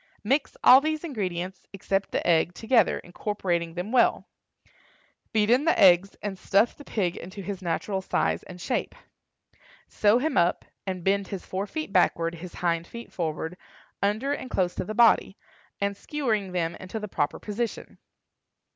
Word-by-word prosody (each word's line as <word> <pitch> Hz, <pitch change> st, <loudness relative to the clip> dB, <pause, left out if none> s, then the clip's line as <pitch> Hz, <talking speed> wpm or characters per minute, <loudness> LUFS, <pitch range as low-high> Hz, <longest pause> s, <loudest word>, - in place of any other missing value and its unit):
Mix 270 Hz, +6 st, 0 dB
all 260 Hz, +2 st, +9 dB
these 310 Hz, +1 st, -2 dB
ingredients, 185 Hz, -, -4 dB
except 195 Hz, 0 st, -1 dB
the -, -, -2 dB
egg, 170 Hz, +1 st, +3 dB
together, 225 Hz, -2 st, +3 dB
incorporating 175 Hz, -3 st, -3 dB
them 180 Hz, +5 st, -4 dB
well; 250 Hz, -, +3 dB, 1.1 s
beat 215 Hz, 0 st, +2 dB
in 260 Hz, +5 st, +4 dB
the 330 Hz, -, +3 dB
eggs, 190 Hz, 0 st, +6 dB
and 195 Hz, -2 st, -4 dB
stuff 205 Hz, +4 st, +2 dB
the 290 Hz, -, -12 dB
pig 185 Hz, -10 st, -1 dB
into 190 Hz, +3 st, -8 dB
his 195 Hz, 0 st, -5 dB
natural 190 Hz, +3 st, -2 dB
size -, -, 0 dB
and 180 Hz, -1 st, -11 dB
shape. 245 Hz, +8 st, -2 dB, 0.9 s
Sew 210 Hz, +2 st, +3 dB
him 285 Hz, +3 st, 0 dB
up, 175 Hz, +1 st, +2 dB, 0.2 s
and 185 Hz, -2 st, -3 dB
bend 195 Hz, +1 st, +1 dB
his 195 Hz, -3 st, -6 dB
fore 195 Hz, +2 st, -3 dB
feet 310 Hz, -4 st, -5 dB
backward, 170 Hz, -2 st, +2 dB
his 170 Hz, +1 st, -9 dB
hind 170 Hz, -1 st, -1 dB
feet 235 Hz, 0 st, -10 dB
forward, 160 Hz, 0 st, -3 dB, 0.5 s
under 215 Hz, +8 st, 0 dB
and 260 Hz, -3 st, -5 dB
close 180 Hz, -2 st, 0 dB
to -, -, -3 dB
the 215 Hz, -, -5 dB
body, 230 Hz, -3 st, +4 dB, 0.4 s
and 200 Hz, 0 st, -1 dB
skewering 220 Hz, -7 st, -2 dB
them 170 Hz, -2 st, -1 dB
into 185 Hz, +4 st, -6 dB
the 210 Hz, -, -5 dB
proper 145 Hz, -6 st, -1 dB
position. 220 Hz, +2 st, -5 dB
195 Hz, 165 wpm, -26 LUFS, 180-225 Hz, 1.1 s, all